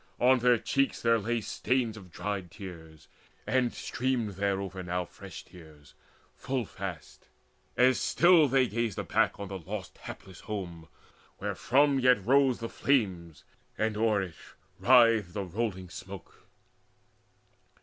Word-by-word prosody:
On 130 +1 +5
their 125 0 +4
cheeks 135 +4 0
there 115 -1 +3
lay 115 +2 -1
Stains 120 +1 -1
of 95 -5 -12
dried 100 -1 -4
tears, 80 -5 -11 0.4
and 125 -2 +1
streamed 125 -4 -2
thereover 95 -1 -2
now 90 0 -2
Fresh - - -11
tears 80 -4 -16 0.4
full 130 -3 -2
fast, 95 -4 -8 0.5
as 125 +1 +4
still 170 -3 +5
they 130 -1 +3
gazed 115 -2 -2
aback - - 0
On 100 - -5
the 95 0 -6
lost 95 +3 -7
hapless 95 -2 -10
home, 90 -6 -6 0.5
wherefrom 140 +1 +2
yet 125 -6 +3
rose 135 0 +4
The 115 - -3
flames, 95 - -1 0.3
and 110 0 0
o'er 105 -2 +2
it 90 -4 -8 0.4
writhed 115 -7 +5
the 100 - -3
rolling 95 -2 -4
smoke. 95 0 -11
105 Hz, 130 wpm, -29 LUFS, 95-125 Hz, 0.5 s, On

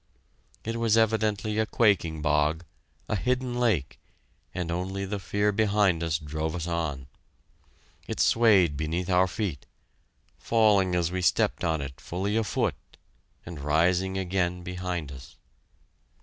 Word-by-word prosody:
It 115 +1 -3
was 115 -1 +2
evidently 110 -1 +1
a 110 - +1
quaking 85 -10 +1
bog, 75 +2 +1 0.4
a - - -1
hidden 125 +3 -1
lake, 110 - 0 0.5
and 90 -2 -4
only 95 +3 -3
the 100 +1 -4
fear 105 +2 0
behind 100 -4 +2
us 80 -2 0
drove 80 +1 -4
us 85 -2 -3
on. 80 -6 -3 1.0
It - - -5
swayed 100 -9 +4
beneath 85 +5 -2
our 90 +1 +4
feet, 90 - -4 0.7
falling 105 -5 +3
as 85 -1 0
we 95 0 -2
stepped 90 - +1
on 80 -2 0
it 65 -1 -8
fully 95 +4 -3
a 115 - +2
foot, 105 - -3 0.5
and 85 -3 -8
rising 90 +6 +1
again 90 -1 -1
behind 90 -4 -4
us. 65 -2 -12
90 Hz, 135 wpm, -27 LUFS, 80-105 Hz, 1.0 s, swayed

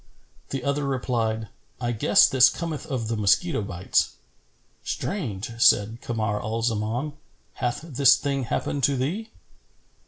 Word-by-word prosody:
The 135 -2 -4
other 140 +2 0
replied, 115 -5 -1 0.3
"I 120 -1 -1
guess 115 - +5
this 130 -1 +6
cometh 165 -1 -5
of 125 -5 -3
the 115 - -1
mosquito 110 - +2
bites." 90 -2 0 0.7
"Strange!" 115 - -4
said 110 +2 +4
Kamar 110 -3 -2
al 110 +2 -3
Zaman. 115 +5 -1 0.4
"Hath 125 +1 -2
this 140 -4 +5
thing 140 -2 -2
happened 140 +4 -2
to 140 -1 +1
thee?" 185 - -2
125 Hz, 130 wpm, -25 LUFS, 110-140 Hz, 0.7 s, this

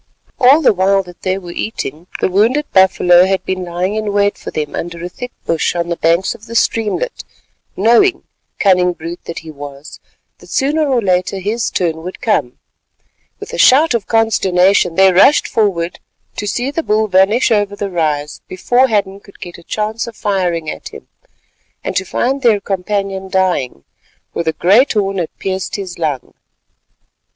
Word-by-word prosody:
All 275 +6 +5
the 255 - +5
while 195 +1 +2
that 180 -1 -15
they 185 0 -1
were 175 -3 -8
eating, 170 -4 -5
the - - +3
wounded 225 +10 +2
buffalo 180 -1 +5
had 190 -1 -1
been 185 -1 -3
lying 180 +3 -2
in 215 -1 -2
wait 205 0 +1
for - - -8
them 150 -1 -4
under 170 0 -5
a - - -5
thick 250 +7 -8
bush 165 +1 0
on 170 0 -2
the 170 - -1
banks 170 +3 +1
of 220 - -15
the 230 - -8
streamlet, 230 - -1 0.5
knowing—cunning 200 - +2
brute 170 +1 -8
that 170 - -7
he 160 - -8
was—that 145 0 -13
sooner 295 +2 0
or 250 -4 +1
later 185 0 0
his 215 +5 -2
turn 165 -3 -2
would 180 +3 -8
come. 210 - -1 0.8
With 430 +2 -9
a - - -4
shout 285 +3 +5
of 230 -4 -2
consternation 190 -5 +2
they 190 0 +5
rushed 265 +11 +5
forward 180 -6 -1 0.4
to 210 - -3
see 245 +6 -2
the 330 - -2
bull 220 -6 +1
vanish 200 +6 +3
over 205 -2 +1
the 200 -1 -4
rise 150 -4 -2
before 245 +8 +1
Hadden 200 -4 -1
could 200 0 -19
get 175 -1 -9
a - - -16
chance 215 +5 -3
of 230 - -9
firing 180 -6 -1
at - - -6
him, - - -13 0.7
and - - -4
to 185 - 0
find 270 +8 -1
their 230 -5 +3
companion 195 0 -3
dying, 180 - -1 0.5
for - - -2
the 160 -1 -1
great 215 - +3
horn 195 -3 -1
had 170 - -2
pierced 190 -1 -3
his 185 -4 -6
lung. 145 -6 -3
190 Hz, 175 wpm, -16 LUFS, 175-220 Hz, 0.8 s, All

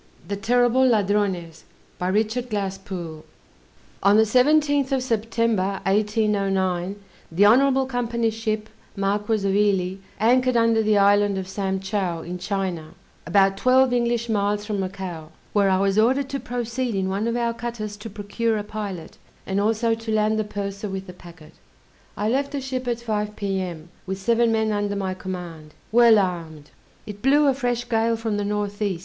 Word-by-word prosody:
THE 200 - -2
TERRIBLE 245 +4 +3
LADRONES 200 -7 0 0.4
RICHARD 215 +6 0
GLASSPOOLE 190 -6 -5 0.8
On 200 +2 +5
the 220 - +6
17th 285 +4 +3
of 265 -2 +1
September, 225 -4 0
1809, 195 -3 0 0.4
the 190 +5 +4
Honorable 265 +4 +4
Company's 235 -3 -1
ship 215 -1 -2 0.3
Marquis 205 +2 0
of 195 - +1
Ely 190 -3 +1 0.2
anchored 250 +2 +3
under 230 -1 +3
the 215 -1 +2
Island 200 0 +4
of 190 -1 -4
Sam 190 0 -2
Chow, 190 -4 -2
in 180 +1 -6
China, 180 -4 -3 0.3
about 195 -1 +3
twelve 255 +2 +4
English 235 -1 0
miles 205 -1 0
from 210 -2 -2
Macao, 185 -4 -5 0.2
where 200 -2 +3
I 190 - +3
was 195 +2 +2
ordered 265 +5 +2
to 275 - -3
proceed 245 -1 -3
in 190 -1 0
one 200 +4 -1
of 235 - -1
our 235 -1 0
cutters 230 -3 -5
to 215 +2 -8
procure 215 +2 -2
a 210 - -3
pilot, 205 -6 -7 0.3
and 195 +1 0
also 225 +2 +1
to 225 0 -4
land 215 0 +2
the - - +1
purser 200 0 -5
with 190 0 -5
the 180 - -10
packet. 170 -3 -15 0.6
I 210 - -1
left 275 +5 0
the 285 - -1
ship 255 -1 -4
at 240 -1 -1
5 210 -2 -2
P.M. 185 -5 -4 0.2
with 190 0 -3
seven 230 +4 +2
men 220 -1 +1
under 205 -1 -1
my 190 -2 -2
command, 175 -5 -8 0.2
well 230 -1 +6
armed. 165 -6 -3 0.3
It 205 -1 -9
blew 285 +4 +4
a 275 - +4
fresh 245 -2 -2
gale 230 0 +1
from 225 -2 -2
the 205 - -1
N. 205 0 -1 0.2
E. 185 -4 -3
210 Hz, 165 wpm, -23 LUFS, 195-230 Hz, 0.8 s, the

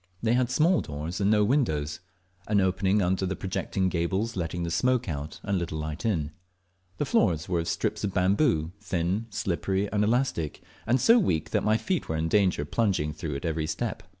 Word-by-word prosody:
They 115 0 +3
had 125 0 +2
small 155 +8 +3
doors 75 +5 -5
and 100 - +3
no 105 -1 +4
windows, 100 - 0 0.5
an 105 -1 +3
opening 95 +1 +2
under 95 +1 +1
the 95 - -2
projecting 95 0 -2
gables 95 +6 -1
letting 85 -1 -2
the 85 - -3
smoke 125 +6 +1
out 75 -2 -5
and 100 -1 -1
a - - 0
little 80 -2 -3
light 75 +5 -5
in. 80 -8 0 0.7
The - - 0
floors 80 -1 +2
were 90 -2 0
of 85 - -3
strips 105 +6 -1
of 100 - 0
bamboo, 95 - +2
thin, 95 +3 -1
slippery, 95 +1 -1
and 105 -1 +2
elastic, 110 - 0 0.2
and 125 +3 +3
so 230 - +6
weak 80 - 0
that - - +1
my 110 +1 +3
feet 185 +7 -2
were 80 - -1
in 80 +1 -1
danger 95 -7 +2
of 75 - -12
plunging 95 -10 +1
through 75 -1 -5
at 70 - -5
every 80 -1 -1
step. 115 +6 -3
95 Hz, 205 wpm, -27 LUFS, 80-110 Hz, 0.7 s, so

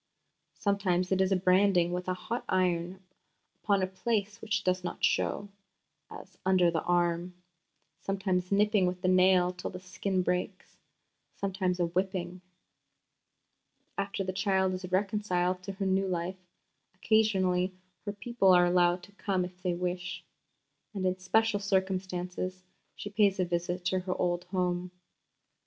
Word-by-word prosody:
Sometimes 190 -3 0
it 190 0 +3
is 190 0 +2
branding 185 -1 +3
with 180 0 -3
a 185 - 0
hot 235 +6 -4
iron 185 0 0 0.6
upon 200 -3 +2
a - - +4
place 205 +2 -2
which 220 -1 -1
does 185 0 0
not 175 - -5
show, 205 - +1 0.6
as - - -12
under 185 -2 +4
the 165 -1 -1
arm; 175 0 0 0.6
sometimes 190 -2 -1
nipping 205 -1 +3
with 180 0 -4
the - - +2
nail 185 -1 +4
till 180 - -5
the 180 - -8
skin 185 +1 -2
breaks; 180 +1 -3 0.6
sometimes 185 -2 -1
a 175 - +3
whipping. 180 0 -2 1.5
After 200 0 -2
the 185 0 -3
child 190 -1 +1
is 185 0 -6
reconciled 185 -2 0
to 195 +1 -6
her 195 0 -3
new 190 0 +1
life, 180 +1 -4 0.5
occasionally 190 -3 +2 0.3
her 205 - -2
people 205 -1 +2
are 175 0 +6
allowed 175 0 +3
to 200 - -14
come 195 -2 -1
if 180 0 -12
they 180 -2 0
wish; 180 0 -3 0.7
and 190 -2 -2
in 185 0 0
special 215 +3 +2
circumstances 185 -2 -2 0.3
she 205 - -7
pays 205 -2 +3
a 185 - +2
visit 175 +1 -2
to 185 0 +1
her 185 0 -4
old 175 0 0
home. 180 -1 -1
185 Hz, 145 wpm, -30 LUFS, 180-195 Hz, 1.5 s, are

